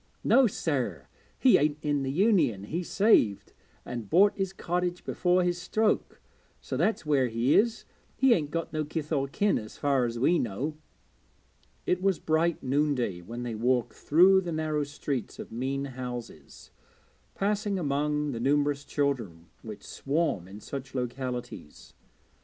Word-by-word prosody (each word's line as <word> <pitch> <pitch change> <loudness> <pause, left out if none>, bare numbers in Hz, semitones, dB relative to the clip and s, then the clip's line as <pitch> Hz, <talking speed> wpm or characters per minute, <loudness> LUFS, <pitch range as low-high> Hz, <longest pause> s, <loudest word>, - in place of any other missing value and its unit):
'No 265 -2 +5
sir, 145 - -2 0.3
he 260 - +5
ain't 150 0 +1
in 145 -1 0
the 135 - -2
Union; 170 - +2
he 160 - -3
saved, 175 - +2 0.3
and 120 -5 -6
bought 200 +4 +5
his 195 -2 -2
cottage 180 -1 -2
before 180 0 +2
his 175 0 -1
stroke, 215 +4 0 0.4
so - - -5
that's 220 -6 0
where 140 -4 +2
he 115 +4 +1
is. 230 +1 +2 0.3
He 265 -2 +5
ain't 150 -8 0
got 165 +2 -4
no 155 0 0
kith 150 +1 -5
or 140 -3 +1
kin, 200 +9 +1
as 110 0 -10
far 140 -3 +2
as 120 0 -3
we 165 +8 +3
know.' 125 +8 -3 1.1
It 180 0 0
was 195 -1 +2
bright 160 +1 0
noonday 130 -8 0
when 120 +7 -7
they 120 -2 -4
walked 120 +2 0
through 185 +5 +5
the 175 -2 -5
narrow 155 -2 -1
streets 140 -3 -4
of - - -9
mean 135 +4 -2
houses, 125 -3 -8 0.6
passing 205 0 0
among 150 -1 0
the 115 - -4
numerous 145 +2 +1
children 120 - -2
which - - -9
swarm 140 - -1
in 100 +3 -11
such 135 +2 -7
localities. 125 - -5
145 Hz, 150 wpm, -28 LUFS, 125-175 Hz, 1.1 s, No